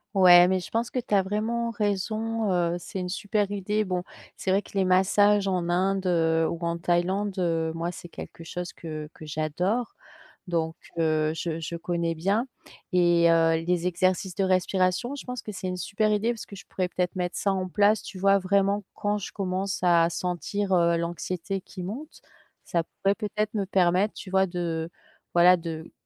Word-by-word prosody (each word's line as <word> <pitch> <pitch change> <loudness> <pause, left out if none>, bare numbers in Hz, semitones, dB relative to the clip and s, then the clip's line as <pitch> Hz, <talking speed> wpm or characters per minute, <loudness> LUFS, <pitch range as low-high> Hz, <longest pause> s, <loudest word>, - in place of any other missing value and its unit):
Ouais, 180 -2 +8
mais 185 0 +2
je - - -9
pense 230 +1 0
que 255 - -2
tu 235 - -5
as 200 - +6
vraiment 220 +4 -1
raison. 215 +1 -1
Heu, 175 -1 +1
c'est 190 +2 -6
une 180 - -3
super 205 +1 -1
idée. 205 +2 0
Bon, 180 -3 -2 0.3
c'est 190 - -2
vrai 195 +2 +3
que - - -16
les 190 - +3
massages 200 +2 +4
en 180 -2 0
Inde, 190 +2 +1
heu, 165 -2 +2
ou 170 - -3
en 170 0 -1
Thaïlande, 185 +4 0
heu, 165 -2 0
moi, 170 +1 -2
c'est 175 - -10
quelque 165 - -10
chose 180 +2 -6
que 155 -2 -7
que 155 - -11
j'adore. 165 +10 -1 0.5
Donc, 165 -2 -1 0.2
heu, 155 -1 +2
je 165 0 -3
je 165 +1 -5
connais 170 0 -2
bien, 200 +10 0 0.5
et, 175 -1 +4
heu, 165 0 +3
les 175 0 0
exercices 185 +1 0
de 195 - +1
respiration, 185 +5 +1
je 285 - -8
pense 250 -1 -5
que 215 - -7
c'est 185 -2 -5
une 180 - -2
super 205 +3 0
idée 215 +3 +1
parce 230 - -8
que 200 - -11
je - - -11
pourrais 185 -1 -1
peut-être 180 0 -2
mettre 180 0 -2
ça 200 - +1
en 185 -1 -2
place, 205 +3 +3
tu 190 - -9
vois, 195 +1 +4
vraiment 200 +2 +1
quand 205 0 0
je 200 - -6
commence 190 0 -2
à 170 -2 +5
sentir 185 +3 -2 0.2
l'anxiété 175 +3 -3
qui 185 -1 -9
monte. 250 - -7 0.4
Ça 170 -1 0 0.2
pourrait 195 +1 +3
peut-être 210 +1 -2
me 200 - 0
permettre, 190 +2 +2
tu 190 - -9
vois 190 0 +3
de 170 -2 -3 0.4
voilà 180 +1 +7
de 165 -1 -6
185 Hz, 190 wpm, -26 LUFS, 170-205 Hz, 0.5 s, Ouais